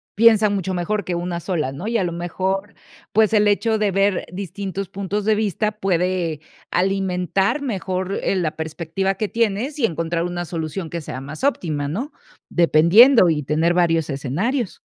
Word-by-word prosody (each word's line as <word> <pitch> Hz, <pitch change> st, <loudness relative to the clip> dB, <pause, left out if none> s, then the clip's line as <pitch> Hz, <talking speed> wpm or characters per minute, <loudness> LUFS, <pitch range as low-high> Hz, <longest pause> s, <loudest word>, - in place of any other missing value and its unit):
piensan 215 Hz, -2 st, +5 dB
mucho 190 Hz, -1 st, -2 dB
mejor 200 Hz, +4 st, -1 dB
que 180 Hz, -, -3 dB
una 175 Hz, 0 st, -3 dB
sola, 155 Hz, -8 st, -2 dB
¿no? 180 Hz, +10 st, -6 dB
Y, 230 Hz, -, +1 dB
a 195 Hz, -, +1 dB
lo 170 Hz, -, -3 dB
mejor, 190 Hz, +4 st, -3 dB, 0.4 s
pues, 220 Hz, 0 st, +3 dB
el 210 Hz, -1 st, +4 dB
hecho 220 Hz, +2 st, +2 dB
de 210 Hz, -2 st, +1 dB
ver 195 Hz, 0 st, +1 dB
distintos 195 Hz, +1 st, -5 dB
puntos 200 Hz, +1 st, -3 dB
de 215 Hz, 0 st, +3 dB
vista 210 Hz, 0 st, -1 dB
puede 180 Hz, -5 st, -1 dB, 0.3 s
alimentar 190 Hz, +5 st, 0 dB
mejor, 190 Hz, -6 st, -3 dB
eh, -, -, +1 dB
la 170 Hz, -5 st, -1 dB
perspectiva 165 Hz, +4 st, -2 dB
que 215 Hz, +2 st, -2 dB
tienes, 230 Hz, +6 st, -1 dB
y 235 Hz, -, +3 dB
encontrar 165 Hz, -1 st, -1 dB
una 175 Hz, 0 st, -3 dB
solución 165 Hz, 0 st, -4 dB
que 170 Hz, 0 st, -4 dB
sea 130 Hz, -3 st, -6 dB
más 145 Hz, -, -9 dB
óptima, 155 Hz, -, 0 dB
¿no?, 240 Hz, -, -4 dB, 0.4 s
dependiendo 175 Hz, -, +6 dB
y 150 Hz, -2 st, 0 dB
tener 160 Hz, +5 st, +1 dB
varios 165 Hz, -3 st, +2 dB
escenarios. 185 Hz, -, -2 dB
185 Hz, 170 wpm, -21 LUFS, 170-210 Hz, 0.4 s, dependiendo